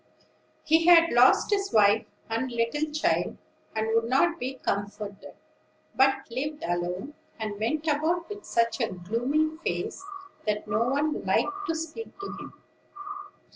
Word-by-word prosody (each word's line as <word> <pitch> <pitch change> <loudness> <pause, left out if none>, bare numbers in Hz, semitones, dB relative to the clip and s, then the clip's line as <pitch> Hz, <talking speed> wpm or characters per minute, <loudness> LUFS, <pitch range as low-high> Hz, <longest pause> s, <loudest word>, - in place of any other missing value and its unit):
He 320 +2 +3
had 335 -1 +7
lost 245 - +5
his 395 -1 +1
wife 215 +1 +4 0.2
and 230 +3 -2
little 240 +7 -1
child, 305 +1 0 0.4
and 220 0 0
would 230 0 +3
not 335 +8 +2
be 260 +2 -3
comforted; 205 -3 -4 0.6
but 270 +1 +3
lived 295 +5 -4
alone, 175 - -2 0.3
and 210 -2 -4
went 300 +8 -1
about 320 +3 +1
with 410 -1 -8
such 230 +3 0
a 225 - 0
gloomy 245 - -1
face 340 +3 -3 0.4
that 210 0 -1
no 210 +3 +1
one 285 +4 0
liked 395 0 0
to 325 - 0
speak 325 +8 -6
to 395 - -5
him. - - -11
260 Hz, 140 wpm, -27 LUFS, 220-315 Hz, 0.6 s, had